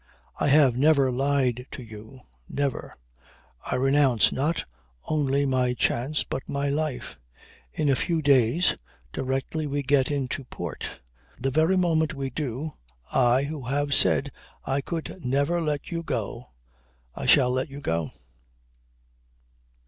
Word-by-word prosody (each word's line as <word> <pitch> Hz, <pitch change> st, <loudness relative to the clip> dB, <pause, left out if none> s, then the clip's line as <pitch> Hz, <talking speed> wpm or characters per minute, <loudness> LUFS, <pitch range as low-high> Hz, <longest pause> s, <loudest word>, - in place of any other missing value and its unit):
I -, -, +1 dB
have 140 Hz, -4 st, +5 dB
never 140 Hz, -1 st, +4 dB
lied 130 Hz, -1 st, 0 dB
to 130 Hz, -, -7 dB
you. 110 Hz, +3 st, -12 dB, 0.3 s
Never. 140 Hz, -2 st, -2 dB, 0.7 s
I -, -, -2 dB
renounce 135 Hz, -3 st, +3 dB
not 150 Hz, +5 st, -1 dB, 0.4 s
only 140 Hz, -2 st, +1 dB
my 130 Hz, -2 st, +1 dB
chance 135 Hz, +5 st, 0 dB
but -, -, -4 dB
my 140 Hz, 0 st, -1 dB
life. 150 Hz, -2 st, -3 dB, 0.5 s
In 155 Hz, -, -1 dB
a 140 Hz, -, +4 dB
few 165 Hz, +4 st, 0 dB
days, 140 Hz, +4 st, +4 dB, 0.4 s
directly 135 Hz, +4 st, -2 dB
we 145 Hz, 0 st, -2 dB
get 135 Hz, -1 st, +3 dB
into 140 Hz, -1 st, -2 dB
port, 85 Hz, -, -6 dB, 0.5 s
the 135 Hz, +2 st, -1 dB
very 160 Hz, +7 st, +3 dB
moment 160 Hz, -3 st, +1 dB
we 135 Hz, -1 st, -4 dB
do, 145 Hz, +2 st, -4 dB, 0.4 s
I, 125 Hz, +1 st, +4 dB
who 145 Hz, -2 st, -5 dB
have 145 Hz, +2 st, 0 dB
said 140 Hz, +1 st, +4 dB, 0.3 s
I 135 Hz, +1 st, 0 dB
could 165 Hz, +3 st, -6 dB
never 140 Hz, +7 st, +1 dB
let 150 Hz, -1 st, -2 dB
you 165 Hz, -1 st, -2 dB
go, 120 Hz, -4 st, -4 dB, 0.7 s
I -, -, -5 dB
shall 125 Hz, -1 st, +5 dB
let 130 Hz, +3 st, -1 dB
you 140 Hz, +1 st, -8 dB
go." 85 Hz, -, -1 dB
140 Hz, 135 wpm, -26 LUFS, 130-150 Hz, 0.7 s, have